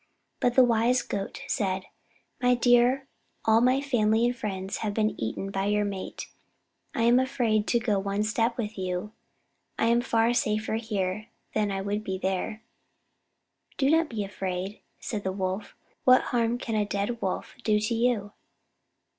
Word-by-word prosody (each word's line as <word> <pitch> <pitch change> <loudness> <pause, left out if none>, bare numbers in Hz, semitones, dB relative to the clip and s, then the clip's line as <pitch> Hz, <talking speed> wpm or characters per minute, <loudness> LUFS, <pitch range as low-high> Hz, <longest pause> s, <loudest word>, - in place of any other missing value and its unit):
But 245 -1 +1
the 260 - +8
wise 240 +1 +3
Goat 195 -1 -4
said: 190 -2 -1 0.6
"My 250 0 +4
dear, 245 +2 +4 0.4
all 225 +1 +5
my 255 +2 +3
family 230 -5 +2
and 245 +1 +1
friends 195 -4 -4
have 210 -2 -3
been 215 -1 +2
eaten 155 +13 -3
by 195 0 -1
your 210 0 +2
mate 195 -2 -5 0.7
I 230 - +1
am 240 +2 +5
afraid 240 -5 +1
to 235 - +3
go 215 -3 +1
one 200 +1 -1
step 230 +2 0
with 215 -3 -4
you. 185 +2 -3 0.7
I - - +2
am 235 +1 +4
far 230 -1 +2
safer 215 -2 0
here 210 -2 -2 0.3
than 210 -1 +1
I 195 -1 -2
would 205 +2 -2
be 190 -2 -3
there." 190 +3 -2 1.1
"Do 275 0 +3
not 325 0 +3
be 220 -3 -2
afraid," 190 0 -4 0.2
said 210 -3 -4
the 190 - -1
Wolf. 190 +1 -3 0.3
"What 255 0 +7
harm 235 0 +2
can 230 - -4
a 215 -1 +2
dead 205 +3 -2
Wolf 190 - -3
do 210 -1 +3
to 210 +2 -1
you?" 230 -3 +1
215 Hz, 165 wpm, -27 LUFS, 200-240 Hz, 1.1 s, the